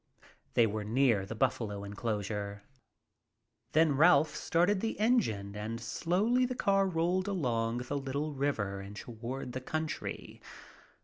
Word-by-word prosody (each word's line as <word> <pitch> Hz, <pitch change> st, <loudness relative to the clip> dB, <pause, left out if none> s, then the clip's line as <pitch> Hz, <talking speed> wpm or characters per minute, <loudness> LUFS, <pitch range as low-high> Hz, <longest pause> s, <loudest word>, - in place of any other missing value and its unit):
They 115 Hz, -, +6 dB
were 110 Hz, 0 st, -2 dB
near 115 Hz, -3 st, +2 dB
the 115 Hz, -, -5 dB
buffalo 110 Hz, -4 st, -1 dB
enclosure. 100 Hz, -1 st, -3 dB, 1.1 s
Then 155 Hz, -2 st, +4 dB
Ralph 160 Hz, +1 st, +5 dB
started 180 Hz, +4 st, +2 dB
the 225 Hz, -2 st, -2 dB
engine 115 Hz, -, +1 dB
and 110 Hz, +2 st, -4 dB
slowly 200 Hz, -, +1 dB
the 250 Hz, 0 st, -1 dB
car 195 Hz, -3 st, +2 dB
rolled 180 Hz, +2 st, 0 dB
along 120 Hz, -11 st, 0 dB
the 145 Hz, -, -2 dB
little 140 Hz, +3 st, -3 dB
river 115 Hz, -9 st, -1 dB
and 100 Hz, +1 st, -9 dB
toward 120 Hz, +4 st, -6 dB
the 130 Hz, -, -5 dB
country. 155 Hz, +4 st, -4 dB
130 Hz, 130 wpm, -31 LUFS, 105-170 Hz, 1.1 s, They